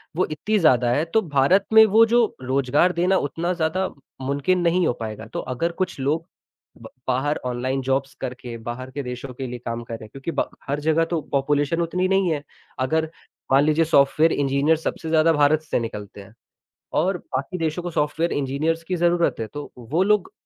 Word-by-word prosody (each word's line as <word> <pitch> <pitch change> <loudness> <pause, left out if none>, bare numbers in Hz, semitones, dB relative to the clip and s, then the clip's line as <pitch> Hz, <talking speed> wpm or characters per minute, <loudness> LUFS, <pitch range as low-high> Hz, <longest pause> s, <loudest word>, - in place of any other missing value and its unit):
वो 185 - +2
इतनी 210 +8 0
ज़्यादा 125 -8 +4
है 145 +5 +2
तो 220 - +4
भारत 160 +4 +3
में 220 0 +9
वो 220 +2 +6
जो 235 +1 +4 0.2
रोज़गार 135 +6 +2
देना 180 +3 +2
उतना 170 +5 -2
ज़्यादा 175 +2 0
म - - -12 0.3
मुमकिन 140 +7 0
नहीं 175 +1 +2
हो - - +3
पाएगा। 110 -1 -6
तो - - -2
अगर 150 +7 -2
कुछ 185 -2 -3
लोग 150 +5 0 0.6
ब - - -10 0.2
बाहर 135 +4 0
ऑनलाइन 125 +2 -1
जॉब्स 135 +1 -1
करके 125 -2 -6
बाहर 130 +2 -5
के 140 +1 -4
देशों 125 +1 -6
के 130 +1 -5
लिए 125 0 -6
काम 115 0 -3
करें 115 -1 -8
क्योंकि 135 +7 -6
ब - - -1 0.2
हर 140 +1 -1
जगह 160 +2 +2
तो 170 - +1
पॉपुलेशन 145 +3 +1
उतनी 180 +2 0
नहीं 195 -2 +2
है। 145 -2 -2 0.4
अगर 160 +5 0 0.4
मान 135 +1 +6
लीजिए 155 +2 +3
सॉफ्टवेयर 155 +1 +4
इंजीनियर 140 +3 +2
सबसे 160 +1 -4
ज़्यादा 160 +1 +4
भारत 150 +1 +3
से - - +1
निकलते 105 -3 -7
हैं 100 +1 -15 0.7
और 185 +4 +1
बाकी 140 +5 -4
देशों 165 +1 -2
को 175 - -4
सॉफ्टवेयर 160 +2 0
इंजीनियर्स 145 +4 -1
की 185 - 0
ज़रूरत 170 0 +2
है 110 - -2
तो 145 0 -6
वो 135 +9 -1
लोग 210 -1 +2
150 Hz, 195 wpm, -23 LUFS, 130-170 Hz, 0.7 s, में